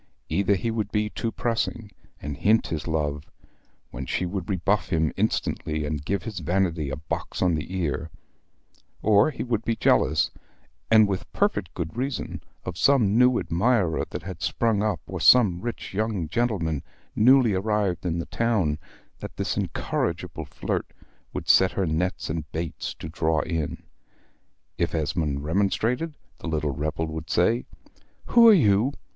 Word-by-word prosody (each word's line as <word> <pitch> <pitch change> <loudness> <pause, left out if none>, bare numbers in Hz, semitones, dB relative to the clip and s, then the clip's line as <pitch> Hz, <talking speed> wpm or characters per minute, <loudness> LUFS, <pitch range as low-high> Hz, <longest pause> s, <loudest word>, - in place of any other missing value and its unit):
Either 100 +4 +2
he 115 +5 -2
would 110 -2 -2
be 105 0 0
too 115 - -3
pressing, 115 -2 -2 0.3
and 70 0 -5
hint 110 +7 +3
his 80 -1 -4
love, 75 -3 -1 0.7
when - - -5
she 90 - -1
would 95 +1 -4
rebuff 95 +2 0
him 80 -3 +1
instantly, 75 -1 -1
and 75 -1 -3
give 100 0 -1
his 110 -5 -5
vanity 85 -2 0
a 70 - -3
box 75 +3 -5
on 90 -2 +3
the 80 +3 -3
ear; 80 -2 -2 0.9
or 105 +4 +5
he 145 - -4
would 115 -3 -1
be 115 +1 0
jealous, 80 -7 +3 0.6
and 110 -2 +6
with 95 -2 -4
perfect 200 - 0
good 85 +2 -4
reason, 130 +3 -3 0.2
of 90 -2 -5
some 120 -8 +4
new 125 +1 +5
admirer 90 0 +1
that - - -6
had 95 -1 -7
sprung 115 -3 +1
up, 105 -5 0
or - - -6
some 100 -9 +6
rich 120 -3 -5
young 105 -5 -1
gentleman 85 - 0 0.3
newly 125 -1 +5
arrived 100 -2 0
in 85 -2 -1
the 85 - -3
town, 100 -11 0 0.4
that - - -8
this - - -1
incorrigible - - -2
flirt - - -4 0.4
would - - -5
set 95 0 +5
her 95 - 0
nets 90 +4 -1
and 75 -1 -4
baits 80 0 -4
to - - -8
draw 80 -1 0
in. 80 -4 -3 1.0
If - - 0
Esmond 75 -3 -1
remonstrated, 110 - 0 0.2
the - - -7
little 75 -2 -1
rebel 75 +4 -2
would 80 +1 -6
say 115 +7 +2 0.6
"Who 235 -1 +7
are - - +10
you? 120 - +4
95 Hz, 160 wpm, -25 LUFS, 80-110 Hz, 1.0 s, are